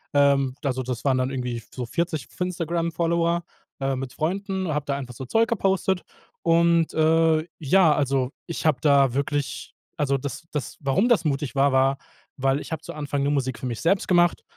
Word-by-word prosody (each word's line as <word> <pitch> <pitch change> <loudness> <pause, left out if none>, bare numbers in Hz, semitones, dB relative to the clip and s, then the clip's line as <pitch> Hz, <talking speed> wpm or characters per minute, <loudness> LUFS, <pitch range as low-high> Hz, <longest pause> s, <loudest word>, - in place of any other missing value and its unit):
Ähm, 140 -2 +4
also, 130 -2 -1
das 120 -2 -4
waren 135 -2 +3
dann 130 +1 0
irgendwie 125 -3 -3
so 125 - -4
40 160 -1 -2
f - - -20
Instagram-Follower, 170 -1 0 0.4
äh, 135 0 0
mit 130 -1 -5
Freunden 190 +4 -2
habe 145 0 -2
da 140 -1 -1
einfach 130 -3 -6
so 130 - -7
Zeug 225 - +2
gepostet. 190 -4 +1 0.4
Und, 170 0 +3
äh, 160 0 +3
ja, 160 +2 +4
also, 135 -3 +1 0.2
ich 170 - -5
habe 150 -4 +3
da 140 -3 +4
wirklich 140 0 -2 0.2
also 140 -3 +1
das 140 +4 -6
das 145 -6 -4
warum 140 - +2
das 235 -7 +4
mutig 145 -1 -1
war, 140 +1 +4
war, 135 +1 +3 0.4
weil 135 +1 +1
ich - - -9
habe 160 -2 -3
zu 170 - -7
Anfang 145 -2 -2
nur 140 - +1
Musik 130 -4 -1
für - - -6
mich 115 -3 -4
selbst 190 +3 +2
gemacht 175 -1 +3
145 Hz, 190 wpm, -24 LUFS, 135-170 Hz, 0.4 s, Ähm